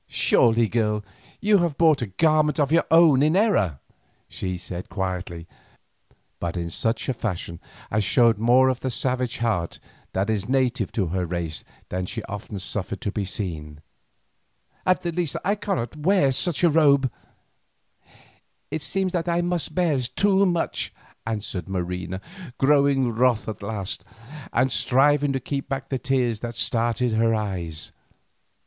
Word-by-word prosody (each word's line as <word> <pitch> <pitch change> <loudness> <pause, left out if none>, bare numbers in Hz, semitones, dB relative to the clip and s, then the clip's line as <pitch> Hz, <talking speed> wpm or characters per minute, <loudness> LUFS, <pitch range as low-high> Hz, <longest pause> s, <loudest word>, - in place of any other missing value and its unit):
"Surely, 115 -1 +4
girl, 105 -2 0 0.4
you 205 -1 +4
have 170 -5 0
brought 160 -5 +4
a 120 - -1
garment 155 - +2
of 145 -1 +2
your 165 +1 +4
own 160 -5 +6
in 155 +3 +3
error," 145 - +2 0.5
she 90 -1 -4
said 90 0 -7
quietly, 90 -3 -4 0.9
but 85 +1 -3
in 85 -1 -3
such 115 +7 -1
a 130 - +1
fashion 90 -7 -4 0.3
as 110 0 +1
showed 115 -1 +4
more 125 +3 +5
of 130 -1 0
the 130 - -2
savage 125 0 -1
heart 110 -8 -1 0.3
that 95 +2 0
is 110 0 -1
native 130 -5 +1
to 100 - 0
her 95 -1 0
race 85 -2 -4 0.3
than 90 0 -3
she - - -5
often 105 0 -7
suffered 95 +1 -4
to 105 -5 -3
be 105 - -2
seen; 80 -7 -5 1.1
"at 185 - +3
the 170 - -1
least 170 -2 -1
I 200 - +3
cannot 195 - -3
wear 155 -2 +3
such 170 +5 0
robes." 145 -5 +4 1.6
"It 155 - -2
seems 185 +5 -1
that 175 -1 -1
I 170 0 +2
must 175 -3 -2
bear 170 -7 +2
too 195 +10 +2
much," 175 -2 -1 0.4
answered 105 -4 -4
Marina, 90 0 -3 0.4
growing 140 -2 +3
wroth 120 0 +2
at 110 -3 -5
last, 100 -1 -4 0.5
and 130 +2 +2
striving 145 +4 +3
to 135 - -1
keep 135 +2 -4
back 135 0 -3
the 130 - -1
tears 125 -4 0
that 120 0 -5
started 120 +1 0
to 110 - 0
her 115 0 +3
eyes. 90 -7 -4
120 Hz, 155 wpm, -24 LUFS, 100-150 Hz, 1.6 s, own